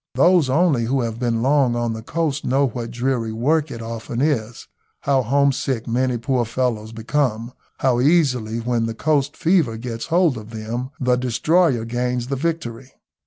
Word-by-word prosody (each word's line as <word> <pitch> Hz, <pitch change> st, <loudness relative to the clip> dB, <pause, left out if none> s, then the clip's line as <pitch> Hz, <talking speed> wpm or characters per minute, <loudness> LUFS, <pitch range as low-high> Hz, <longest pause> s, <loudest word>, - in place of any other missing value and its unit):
Those 175 Hz, -6 st, +4 dB
only 140 Hz, -4 st, +2 dB
who 130 Hz, +3 st, 0 dB
have 115 Hz, -1 st, -3 dB
been 120 Hz, -2 st, 0 dB
long 135 Hz, -3 st, +3 dB
on 120 Hz, -1 st, -1 dB
the 110 Hz, -, -6 dB
coast 150 Hz, +3 st, -2 dB
know 135 Hz, +2 st, +2 dB
what 115 Hz, 0 st, -5 dB
dreary 120 Hz, -1 st, -1 dB
work 145 Hz, +7 st, +1 dB
it 115 Hz, -3 st, -7 dB
often 115 Hz, +1 st, -5 dB
is, 120 Hz, -6 st, -1 dB, 0.3 s
how 135 Hz, -1 st, +2 dB
homesick 135 Hz, -1 st, +1 dB
many 125 Hz, +1 st, 0 dB
poor 125 Hz, +1 st, 0 dB
fellows 115 Hz, -2 st, -2 dB
become, 115 Hz, 0 st, -1 dB, 0.3 s
how 125 Hz, -2 st, +2 dB
easily, 125 Hz, -7 st, +2 dB
when 115 Hz, -1 st, -1 dB
the 115 Hz, -, -4 dB
coast 145 Hz, +1 st, 0 dB
fever 160 Hz, -10 st, +2 dB
gets 115 Hz, +1 st, -5 dB
hold 165 Hz, -7 st, +2 dB
of 110 Hz, 0 st, -12 dB
them, 115 Hz, +3 st, -5 dB
the 125 Hz, -1 st, +2 dB
destroyer 130 Hz, +1 st, +2 dB
gains 125 Hz, +1 st, -2 dB
the 140 Hz, -, 0 dB
victory. 135 Hz, -5 st, -4 dB
125 Hz, 165 wpm, -21 LUFS, 115-140 Hz, 0.3 s, Those